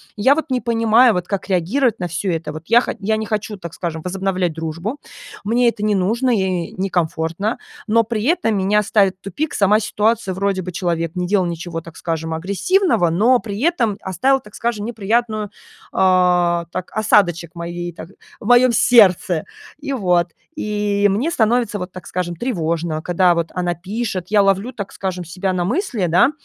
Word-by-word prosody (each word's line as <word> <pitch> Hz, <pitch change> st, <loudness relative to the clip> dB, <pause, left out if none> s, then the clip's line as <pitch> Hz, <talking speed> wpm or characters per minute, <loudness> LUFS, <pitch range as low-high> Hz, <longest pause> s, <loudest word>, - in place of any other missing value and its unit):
Я 260 Hz, +7 st, +4 dB
вот 320 Hz, -3 st, -4 dB
не 250 Hz, -1 st, +1 dB
понимаю, 230 Hz, 0 st, +4 dB
вот 180 Hz, 0 st, -3 dB
как 200 Hz, 0 st, -3 dB
реагировать 220 Hz, +7 st, +1 dB
на 180 Hz, -, -2 dB
всё 180 Hz, +3 st, -2 dB
это. 160 Hz, -2 st, -3 dB
Вот 155 Hz, +1 st, -9 dB
я 235 Hz, +3 st, +6 dB
хо -, -, -3 dB
я 215 Hz, +2 st, 0 dB
не 220 Hz, -, -3 dB
хочу, 210 Hz, -1 st, -3 dB
так 170 Hz, -3 st, -8 dB
скажем, 160 Hz, -3 st, -5 dB
возобновлять 185 Hz, -2 st, -1 dB
дружбу, 165 Hz, -, -5 dB, 0.4 s
мне 235 Hz, +4 st, +3 dB
это 225 Hz, -2 st, -6 dB
не 210 Hz, -1 st, +2 dB
нужно 225 Hz, +7 st, +1 dB
и 185 Hz, -4 st, -1 dB
некомфортно, 180 Hz, +2 st, -1 dB, 0.3 s
но 230 Hz, +1 st, +4 dB
при 220 Hz, -1 st, -3 dB
этом 310 Hz, -8 st, +1 dB
меня 200 Hz, +2 st, +2 dB
ставит 200 Hz, -3 st, +2 dB
в -, -, -62 dB
тупик 285 Hz, -, -3 dB
сама 205 Hz, +1 st, +4 dB
ситуация: 215 Hz, -2 st, 0 dB
вроде 195 Hz, -1 st, 0 dB
бы 180 Hz, 0 st, -6 dB
человек 170 Hz, -2 st, -2 dB
не 180 Hz, 0 st, -1 dB
делал 190 Hz, -1 st, +1 dB
ничего, 170 Hz, 0 st, -5 dB
так 165 Hz, -1 st, -13 dB
скажем, 160 Hz, -1 st, -3 dB
агрессивного, 200 Hz, -, +1 dB
но 225 Hz, +10 st, +3 dB
при 205 Hz, -3 st, -6 dB
этом 240 Hz, -, +1 dB
оставил, 260 Hz, +9 st, +1 dB
так 210 Hz, -5 st, -17 dB
скажем, 225 Hz, -3 st, -2 dB
неприятную, 220 Hz, -1 st, -1 dB, 0.4 s
а, 180 Hz, -2 st, +3 dB
так, 185 Hz, 0 st, -5 dB
осадочек 180 Hz, -6 st, +2 dB
в -, -, -51 dB
моей, 175 Hz, +1 st, -5 dB
так 165 Hz, 0 st, -10 dB, 0.3 s
в -, -, -11 dB
моём 245 Hz, +2 st, +5 dB
сердце. 190 Hz, -8 st, +4 dB, 0.3 s
И 280 Hz, -2 st, -4 dB
вот. 180 Hz, -7 st, +2 dB, 0.3 s
И 205 Hz, -1 st, 0 dB
мне 235 Hz, +12 st, 0 dB
становится 225 Hz, -4 st, +1 dB
вот, 180 Hz, 0 st, -6 dB
так 185 Hz, -, -10 dB
скажем, 175 Hz, -1 st, -3 dB
тревожно, 165 Hz, -6 st, -2 dB
когда 175 Hz, +1 st, +3 dB
вот 170 Hz, -1 st, -1 dB
она 175 Hz, -1 st, -1 dB
пишет, 195 Hz, +1 st, -4 dB
я 210 Hz, -1 st, +4 dB
ловлю, 195 Hz, +5 st, +1 dB
так 200 Hz, -3 st, -6 dB
скажем, 185 Hz, -2 st, -4 dB
себя 185 Hz, +3 st, -3 dB
на 180 Hz, -1 st, 0 dB
мысли, 230 Hz, -, -1 dB
да, 180 Hz, -, +4 dB
195 Hz, 185 wpm, -19 LUFS, 175-225 Hz, 0.4 s, я